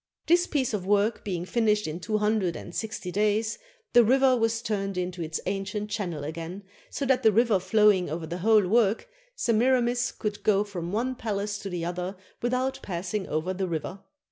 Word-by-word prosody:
This 345 +2 +4
piece 265 -6 0
of 205 -3 -1
work 205 +3 +1
being 180 -4 -3
finished 210 0 +1
in 155 +2 -4
two 215 +5 -1
hundred 210 -4 +1
and 175 - -8
sixty 215 -4 -4
days, 215 +3 +1 0.3
the 240 0 +8
river 260 +3 +4
was 225 0 0
turned 195 -4 -2
into 180 -1 -3
its 160 -1 -3
ancient 200 +2 -3
channel 175 -9 -3
again, 165 +5 -6 0.3
so 280 - -3
that 260 -1 +3
the 220 -3 +5
river 225 -2 +3
flowing 190 -1 +3
over 160 +2 -4
the 170 +3 -5
whole 215 0 +4
work, 225 - +2 0.3
Semira 245 - +3
mis 245 +1 0
could 210 -1 -4
go 205 -1 +3
from 180 -4 -5
one 240 +5 0
palace 205 -3 -3
to 200 - -6
the 175 -2 -3
other 180 +2 -3 0.3
without 255 +2 0
pass 180 0 -5
ing 210 -3 -1
over 155 +5 -1
the 190 0 -2
river. 170 +3 -4
205 Hz, 195 wpm, -27 LUFS, 180-225 Hz, 0.3 s, the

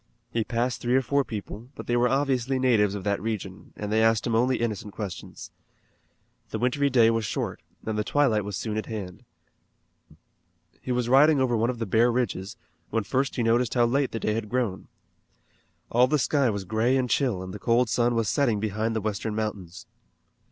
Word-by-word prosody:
He 115 - 0
passed 120 +2 -2
three 120 +1 +1
or 130 - +3
four 140 +2 +1
people, 110 +1 -7
but - - -8
they 120 - 0
were 120 +1 +3
obviously 135 -1 +1
natives 110 -6 +2
of 100 - -5
that 100 -2 -1
region, 105 -3 -5
and 105 0 -4
they 110 +1 +3
asked 115 -1 +3
him 115 - -1
only 125 +3 +2
innocent 110 -2 -3
questions. 100 -5 -7 1.0
The - - -3
wintry 140 +3 +1
day 115 -4 +5
was 115 -1 0
short, 105 - -3 0.2
and 110 - -2
the - - +1
twilight 120 -5 +2
was 100 -1 -4
soon 110 -2 -3
at 110 - -3
hand. 95 -5 -7 1.6
He 130 - -4
was 125 -1 0
riding 140 +4 +5
over 130 -2 +2
one 115 +2 +1
of 125 - -2
the 115 - -3
bare 115 +4 +3
ridges, 115 -3 -2 0.3
when 115 -1 0
first 135 +6 -1
he 120 - 0
noticed 115 +1 +2
how 120 -1 +4
late 135 +3 +1
the 115 - -3
day 105 - 0
had 110 -1 -3
grown. 120 -6 -2 1.0
All 125 +2 +5
the 150 +3 +2
sky 140 -1 +2
was 100 -3 -3
gray 110 +6 +1
and 130 -1 0
chill 120 -8 0
and 95 0 -7
the 105 - -7
cold 120 +3 +2
sun 120 +2 +1
was 115 -2 0
setting 120 -3 +1
behind 110 +2 -1
the 110 - -1
western 105 +1 -3
mountains. 100 -5 -5
115 Hz, 200 wpm, -26 LUFS, 105-125 Hz, 1.6 s, day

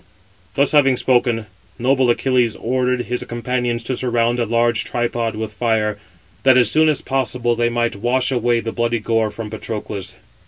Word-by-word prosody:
Thus 140 +1 +2
having 135 -4 +4
spoken, 120 -3 +1 0.3
noble 130 +1 +2
Achilles 120 -2 +1
ordered 125 +1 0
his 125 0 -3
companions 120 0 -2
to 130 +2 -2
surround 120 -1 0
a 120 - 0
large 115 0 +1
tripod 120 -2 -2
with 110 -1 -5
fire, 105 -2 0 0.4
that 130 -1 +5
as 120 -3 +4
soon 155 0 +4
as 150 - 0
possible 125 -2 -1
they 120 0 +1
might 120 -1 -1
wash 125 +5 0
away 120 -2 +1
the 115 - -4
bloody 120 0 0
gore 115 0 0
from 105 0 -7
Patroclus. 105 -3 -5
120 Hz, 165 wpm, -19 LUFS, 115-125 Hz, 0.4 s, that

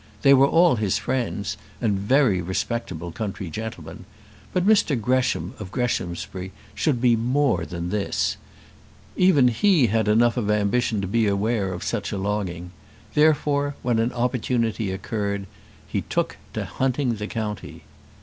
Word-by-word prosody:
They 140 -1 +7
were 135 0 +6
all 165 -3 +4
his 105 -3 +1
friends, 120 -6 -2 0.2
and 105 -3 +1
very 105 -3 +3
respectable 90 -2 -3
country 95 -2 -5
gentlemen; 110 +5 -7 0.5
but 180 0 0
Mr 195 - +3
Gresham 130 +3 0
of 100 -3 -7
Greshamsbury 95 -6 -3 0.2
should 145 -7 0
be 120 -1 +4
more 120 - +1
than 85 0 -5
this: 105 -2 0 0.8
even 160 -9 +5
he 150 - +3
had 110 -2 +2
enough 115 +3 +3
of 105 -4 -1
ambition 105 +1 +1
to 95 - -3
be 110 +2 +2
aware 100 0 0
of 90 - -5
such 105 -4 -2
a 100 - -2
longing. 95 -3 -3 0.4
Therefore, 145 -2 +2
when 120 -2 +1
an 115 +2 +1
opportunity 120 -3 -1
occurred 100 +1 -3 0.4
he - - -2
took - - -2 0.2
to - - -2
hunting 130 -2 -1
the 105 0 -4
county. 105 -8 -5
115 Hz, 145 wpm, -24 LUFS, 100-130 Hz, 0.8 s, They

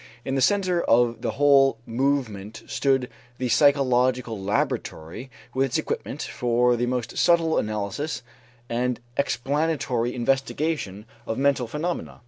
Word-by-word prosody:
In 135 - -2
the 135 - +1
center 185 +3 +2
of 120 -2 +2
the - - -2
whole 140 -3 +5
movement 115 -4 -2
stood 135 -2 +1 0.3
the 125 -1 -2
psychological 125 -4 +3
laboratory 100 +1 -2 0.2
with 135 +1 +2
its 125 - -1
equipment - - -3
for 120 0 +1
the 120 +1 -1
most 120 -2 -2
subtle 165 -2 +3
analysis 110 +8 -3 0.4
and 125 +1 -1 0.2
explanatory 140 -2 0
investigation 135 -4 -1 0.2
of 110 - -2
mental 135 -3 +2
phenomena. 155 +8 -4
125 Hz, 120 wpm, -25 LUFS, 115-140 Hz, 0.4 s, whole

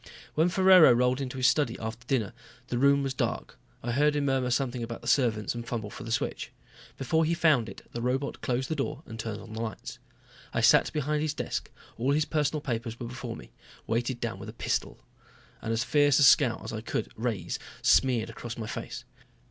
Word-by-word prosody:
When 160 +3 +3
Ferraro 185 -5 +7
rolled 125 +2 +2
into 130 -1 -4
his 130 - 0
study 145 +3 +3
after 115 +2 -6
dinner 120 -8 0 0.4
the 120 - -1
room 140 +1 +4
was 135 -1 -2
dark. - - -3 0.2
I 120 - -2
heard 150 +4 +3
him 145 -1 0
murmur 135 -2 +1
something 125 -1 -1
about 115 0 -5
the 120 - -9
servants 115 -4 +2
and 120 0 -5
fumble 115 -3 -4
for - - -8
the 115 - -6
switch. - - -2 0.5
Before 160 +4 +1
he 165 +2 +1
found 145 -9 +3
it, - - -12
the 120 - -5
robot 130 +3 -2
closed 130 0 -1
the 160 - -2
door 145 +1 -3
and 110 0 -9
turned 110 -2 -4
on 110 - -11
the 110 - -4
lights. 110 -4 -6 0.6
I - - +2
sat - - +5
behind 150 0 -1
his 155 -1 -1
desk, - - -3 0.3
all 130 +4 +2
his 150 +1 +2
personal 150 -1 0
papers 115 -3 -3
before 120 0 -6
me - - -12 0.3
weighted 120 +2 -1
down 115 -1 -4
with - - -8
a - - -8
pistol - - -2 0.6
and 115 - -3
as 115 +1 +1
fierce 145 -1 +3
a - - +5
scowl 125 -3 +5
as 110 - -6
I 110 - -4
could 110 - -3
raise 115 -3 -3 0.2
smeared 125 -4 +3
across 120 0 -7
my 115 - -4
face. - - -6
125 Hz, 210 wpm, -28 LUFS, 115-145 Hz, 0.6 s, Ferraro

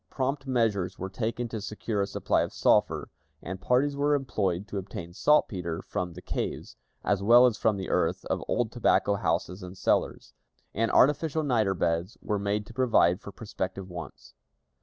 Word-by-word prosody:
Prompt 135 +1 -2
measures 105 -7 0
were 95 0 -5
taken 115 +3 -2
to 110 -2 -5
secure 105 0 -3
a 100 - 0
supply - - 0
of - - -2
sulphur, - - +2 0.3
and 90 +2 -7
parties 140 +3 +2
were 145 +1 +2
employed 100 -8 -1
to 100 - -3
obtain 85 -3 -8
saltpeter 90 - +1
from 90 -1 -4
the 90 - -11
caves, - - -4 0.3
as 100 -1 +1
well 120 +5 +7
as 120 -3 +3
from 105 0 +1
the 95 - -4
earth - - 0
of - - -2
old 120 -2 0
tobacco 115 -3 +2
houses 90 0 -1
and 90 +1 -9
cellars; - - 0 0.4
and 115 +2 0
artificial 155 +3 +3
niter 110 -8 +1
beds 85 +3 -1
were 105 -2 -2
made 100 +1 -1
to 115 - -13
provide 110 -8 +3
for 100 - -9
prospective 95 -3 -5
wants. 85 -4 -9
105 Hz, 175 wpm, -28 LUFS, 95-120 Hz, 0.4 s, well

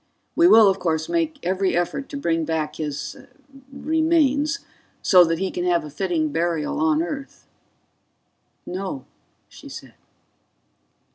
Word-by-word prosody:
"We 335 +1 +6
will, 220 - +8
of 195 0 +2
course, 160 -2 -1
make 325 -2 -1
every 185 0 0
effort 175 +10 -2
to 280 - -5
bring 165 -11 0
back 155 -1 -2
his... 150 -2 -4 0.5
remains... 310 +1 +1 0.4
so 180 -2 +7
that 165 0 0
he 190 +2 -2
can 175 - -3
have 175 -3 +1
a 150 - -9
fitting 165 -1 -1
burial 165 - -1
on 315 0 +2
Earth." 280 -5 -7 1.2
"No," 185 -7 -5 0.4
she - - -13
said. - - -10
190 Hz, 135 wpm, -23 LUFS, -, 1.2 s, will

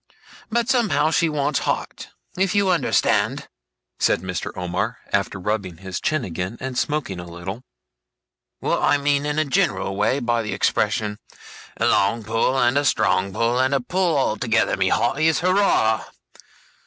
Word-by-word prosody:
But 235 0 0
somehow 230 - +2
she 165 0 +2
wants 145 -1 0
heart. - - -3 0.3
If 190 +2 0
you 200 -2 +3
understand,' 175 - +1 0.5
said 80 - +2
Mr. 90 -2 -4
Omer, 90 0 -2 0.2
after - - 0
rubbing 95 -3 -3
his 95 0 -5
chin 155 -5 0
again, 90 +5 -5
and 130 0 -5
smoking 145 - -2
a 90 - -7
little, 85 +6 -7 1.0
'what - - 0
I - - +3
mean 145 0 0
in 150 0 -2
a 155 - +2
general 145 - 0
way 105 +6 +1
by 120 -2 0
the 105 - -4
expression, 105 0 0 0.6
"A - - 0
long 115 +3 +2
pull, 115 +4 0
and 130 +2 +3
a - - -1
strong 100 -7 +1
pull, 115 +4 0
and 130 +2 +2
a - - +2
pull 175 +4 0
altogether, 115 -3 +1
my 95 -1 +1
hearties, 155 - +2
hurrah!" 180 - +2
120 Hz, 155 wpm, -22 LUFS, 105-155 Hz, 1.0 s, you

